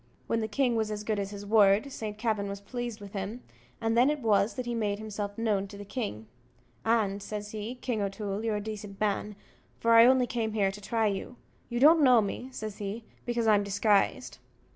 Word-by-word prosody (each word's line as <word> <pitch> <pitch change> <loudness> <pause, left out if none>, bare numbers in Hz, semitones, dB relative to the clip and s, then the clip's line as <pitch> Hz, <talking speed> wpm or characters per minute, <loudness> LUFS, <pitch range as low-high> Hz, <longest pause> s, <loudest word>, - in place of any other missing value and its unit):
When 230 - 0
the 220 - -1
king 245 +2 +1
was 220 -1 0
as 210 -1 -4
good 210 -1 -1
as 195 -1 -2
his 205 0 -8
word, 210 +4 +4
Saint 215 -4 -5
Kavin 215 -3 -1
was 200 0 -5
pleased 240 +1 -5
with 200 -1 -11
him, 205 +5 -5 0.4
and 225 0 0
then 245 +4 +5
it 300 - 0
was 215 -2 +2
that 255 - -4
he 240 - -2
made 210 -3 -1
himself 205 -1 -5
known 210 -4 0
to 200 - -11
the 205 - -8
king. 195 - -4 0.6
"And," 205 -2 +1
says 210 0 -6
he, 220 +3 -5
"King 245 -3 -2
O'Toole, 200 +1 -3
you're 225 -2 0
a 205 - -2
decent 205 -2 -7
man, 210 0 -1 0.4
for 230 - +2
I 230 +1 +9
only 260 -1 +5
came 230 -3 -2
here 200 -3 +2
to 205 +1 -10
try 225 +2 0
you. 205 +4 -2 0.3
You 240 -1 -2
don't 310 +4 +7
know 250 -3 +7
me," 220 +5 -3
says 215 -4 -6
he, 210 +3 -4 0.2
"because 240 -1 0
I'm 210 -2 +4
disguised." 200 0 +1
215 Hz, 215 wpm, -29 LUFS, 200-230 Hz, 0.6 s, I